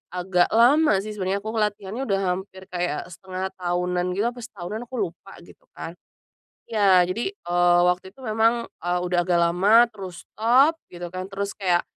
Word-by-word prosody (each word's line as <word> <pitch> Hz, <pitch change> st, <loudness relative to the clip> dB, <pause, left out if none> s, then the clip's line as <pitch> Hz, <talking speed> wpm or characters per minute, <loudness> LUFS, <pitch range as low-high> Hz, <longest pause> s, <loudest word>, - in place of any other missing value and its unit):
agak 180 Hz, 0 st, +2 dB
lama 245 Hz, -3 st, +5 dB
sih 215 Hz, -, -6 dB
sebenarnya 200 Hz, 0 st, -2 dB
aku 220 Hz, -, -4 dB
ngelatihannya 210 Hz, +2 st, -2 dB
udah 195 Hz, -1 st, +1 dB
hampir 190 Hz, +1 st, -3 dB
kayak 175 Hz, -4 st, -2 dB
setengah 190 Hz, +1 st, -5 dB
tahunan 180 Hz, 0 st, -1 dB
gitu, 230 Hz, +4 st, 0 dB
apa 245 Hz, -, -12 dB
setahunan, 220 Hz, 0 st, -7 dB
aku 255 Hz, -, -8 dB, 0.2 s
lupa 195 Hz, +3 st, -16 dB
gitu -, -, -19 dB
kan. 165 Hz, -, -6 dB, 0.8 s
Ya, 195 Hz, -4 st, +5 dB
jadi, 230 Hz, -, -3 dB
eee, 175 Hz, -, +2 dB
waktu 180 Hz, +2 st, 0 dB
itu 265 Hz, -, -14 dB
memang, 225 Hz, +1 st, +2 dB, 0.2 s
e 175 Hz, -, -4 dB
udah 175 Hz, 0 st, 0 dB
agak 175 Hz, -1 st, +3 dB
lama, 210 Hz, +8 st, +4 dB
terus 190 Hz, -4 st, -9 dB
stop 265 Hz, +9 st, +3 dB
gitu 175 Hz, 0 st, -8 dB
kan, 185 Hz, +1 st, -5 dB
terus 200 Hz, 0 st, -4 dB
kayak, 180 Hz, -4 st, +1 dB
190 Hz, 170 wpm, -24 LUFS, 180-220 Hz, 0.8 s, lama